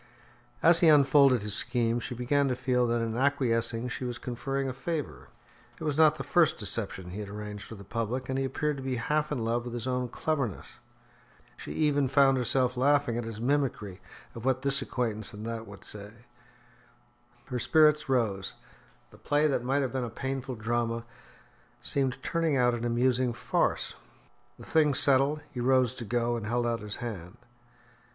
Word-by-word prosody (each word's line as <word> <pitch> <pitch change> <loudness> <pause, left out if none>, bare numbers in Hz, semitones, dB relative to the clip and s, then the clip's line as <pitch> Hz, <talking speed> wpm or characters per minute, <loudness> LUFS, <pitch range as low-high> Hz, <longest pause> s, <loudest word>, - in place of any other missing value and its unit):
As 170 0 +6
he 170 - +5
unfolded 140 -5 +5
his 105 -1 -2
scheme, 115 +2 0
she 125 +1 -6
began 140 +4 +1
to 130 - 0
feel 125 -1 +1
that 120 0 0
in 115 -1 -2
acquiescing 120 -3 +1
she 125 - -5
was 120 -1 -3
conferring 135 +3 -3
a 130 - -3
favour. 135 - -4 0.5
It - - -7
was 150 -2 0
not 155 0 +5
the - - -5
first 165 -3 +3
deception 95 -4 -4
he 100 - -6
had 105 -2 -6
arranged 105 0 -7
for 115 - -9
the 100 - -11
public, 115 +5 -3
and 130 0 -1
he - - 0
appeared 145 +2 -1
to - - -6
be 130 -1 -2
half 150 +6 -1
in 125 -6 -2
love 120 +1 0
with 120 0 -6
his 120 0 -4
own 125 -1 -1
cleverness. 135 - -3 0.8
She - - -8
even 145 -3 +2
found 135 0 +4
herself 125 +1 +1
laughing 140 -1 +2
at 120 -1 -3
his 115 -1 -6
mimicry 120 -7 -1 0.3
of 115 - -9
what 130 0 0
this 140 0 +2
acquaintance 110 -4 -3
and 105 +1 -8
that 115 -1 -5
would 100 -1 -12
say. 105 +3 -10 1.2
Her 125 - -4
spirits 150 +2 +4
rose; 105 -7 0 0.6
the - - -17
play 145 +1 +1
that 135 -5 +1
might 135 +3 +1
have 130 - -3
been 130 -1 -1
a 120 - -3
painful 130 +2 -4
drama 115 +1 -2 0.7
seemed 135 -3 0
turning 165 -4 0
out 125 -1 +3
an 120 0 -3
amusing 125 +1 +1
farce. - - 0 0.6
The - - -12
thing 150 -3 +3
settled, 140 +3 +3
he 125 - -6
rose 130 -1 +3
to 120 - -7
go, 120 +2 0
and 110 -2 -5
held 120 +1 0
out 115 -1 0
his 105 0 -5
hand. 105 -4 -7
125 Hz, 185 wpm, -29 LUFS, 115-135 Hz, 1.2 s, As